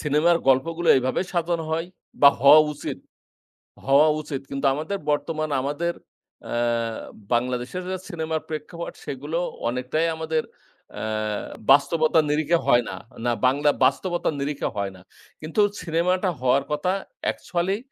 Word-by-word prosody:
সিনেমার 150 +3 +3
গল্পগুলো 165 +6 +2
এভাবে 130 0 -1
সাধন 170 -1 0
হয় 165 +1 -1 0.3
বা 140 - +10
হওয়া 140 +3 +9
উচিত, 150 - -6 0.9
হওয়া 140 +3 +5
উচিত। 140 -3 -5
কিন্তু 140 +1 -3
আমাদের 155 +8 -3
বর্তমানে 155 0 -1
আমাদের 150 +5 -2 0.5
অ্যা - - -4 0.8
বাংলাদেশের 125 +8 -1
যা 185 - -2
সিনেমার 160 -2 -3
প্রেক্ষাপট, 160 +2 -6
সেগুলো 145 +4 -4 0.3
অনেকটাই 125 +7 -1
আমাদের 160 -1 -1 0.6
আ - - -5 0.7
বাস্তবতার 155 +3 +4
নিরিখে 155 +3 +2
হয় 120 0 +5
না, - - -5 0.3
না 120 - +2
বাংলা 140 +3 +3 0.2
বাস্তবতার 175 -3 0
নিরিখে 140 +1 -2
হয় 100 -1 -2
না। 95 - -15 0.4
কিন্তু 160 +7 0 0.2
সিনেমাটা 180 +3 +1
হওয়ার 130 +2 +2
কথা 150 +5 0 0.3
অ্যাকচুয়ালি 180 +3 -1
155 Hz, 125 wpm, -24 LUFS, 140-165 Hz, 0.9 s, বা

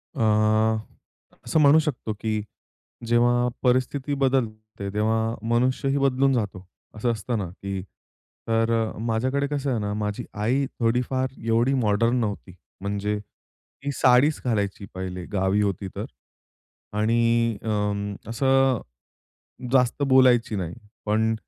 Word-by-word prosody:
अ, - - -3 1.2
असं 160 - +2
म्हणू 150 +1 +7
शकतो 145 -8 -2
की 110 -1 -1 0.7
जेव्हा 120 +1 +3 0.2
परिस्थिती 130 +3 +1
बदलते 110 -7 -1
तेव्हा 110 +2 +1
मनुष्यही 130 +3 +1
बदलून 135 0 +2
जातो, 100 -6 -2 0.3
असं 120 +3 0
असतं 115 +1 -2
ना 95 -4 -3
की 95 +1 -5 0.7
तर 115 0 +2 0.3
माझ्याकडे 125 +5 0
कसं 145 -1 -2
आहे 120 - 0
ना, 105 0 -2
माझी 105 -1 -3
आई 120 +7 +1
थोडीफार 125 +2 0
एवढी 115 +4 +2
मॉडर्न 115 -1 +2
नव्हती, 105 -4 -3 0.3
म्हणजे 105 +1 -2
ती 135 +6 -11
साडीच 130 +4 +4
घालायची 100 -4 -1
पहिले 90 -1 -5
गावी 95 +1 +2
होती 100 -1 -1
तर - - -3 0.9
आणि 115 +1 +2
अं, 105 -1 -1 0.2
असं 135 +1 +2 0.9
जास्त 130 +1 +2
बोलायची 125 -4 +5
नाही. 90 -4 -3 0.3
पण 110 +1 +2
115 Hz, 115 wpm, -25 LUFS, 105-130 Hz, 1.2 s, म्हणू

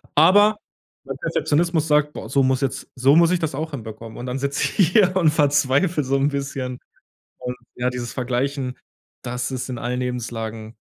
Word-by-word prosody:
Aber 205 +7 +6 0.5
mein - - -5
Perfektionismus 165 - 0
sagt: 150 -1 +2
„Boah, - - -7
so 140 - +3
muss 130 0 +1
jetzt 135 -1 -3
so 135 +3 +4
muss 170 0 +5
ich 180 - +2
das 160 -4 -2
auch 160 +3 -4
hinbekommen.“, 110 -3 -8
und 120 - -6
dann 125 +1 -2
sitze 140 +1 -1 0.2
ich 175 - +5
hier 185 -2 +4
und 170 -5 +4
verzweifle 145 +2 +2
so 135 +1 0
'n 140 +1 +2
bisschen, 135 -3 -4 0.6
und 125 0 -5 0.2
ja, 125 0 0
dieses 125 -1 -5
Vergleichen, 130 +1 -2 0.5
das 125 +2 -3
ist 130 0 -4
in 125 - -4
allen 125 +1 -3
Lebenslagen 115 -3 -4
135 Hz, 180 wpm, -22 LUFS, 125-155 Hz, 0.6 s, Aber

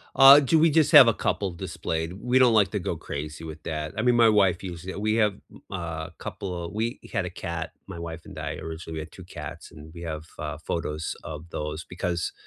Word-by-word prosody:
Uh, 135 +2 +10
do 145 +3 +3
we 160 +1 +5
just 155 -1 +4
have 130 - +10
a 115 - +5
couple 100 -2 -1
displayed. 85 -1 -4
We 125 +7 +1
don't 125 -3 +6
like 100 -3 +4
to 105 - -1
go 90 - -2
crazy 75 +2 -6
with 80 -1 -8
that. 75 -1 -4
I - - +1
mean, 125 +1 +3
my 115 -1 +6
wife 95 -4 +3
used 90 -1 -7
it. 95 - -5
We 110 +1 +1
have, 105 -3 +2
b - - -15
uh, 85 -4 -4
couple 90 -4 -5
a - - -5
we 110 +3 -2
had - - 0
a - - -3
cat- 85 -1 -5 0.2
my 85 - -7
wife 85 0 -7
and - - -11
I, - - -3
originally- 80 0 -7
we - - -3
had 80 +1 -7
2 95 - -11
cats, 90 - -9
and 75 +1 -12
we 85 - -9
have, 80 -2 -5
uh, 75 +1 -4
photos 80 -1 -3
of 80 +2 -8
those 75 +1 -4
because 90 -1 -3
85 Hz, 235 wpm, -26 LUFS, 80-105 Hz, 0.2 s, Uh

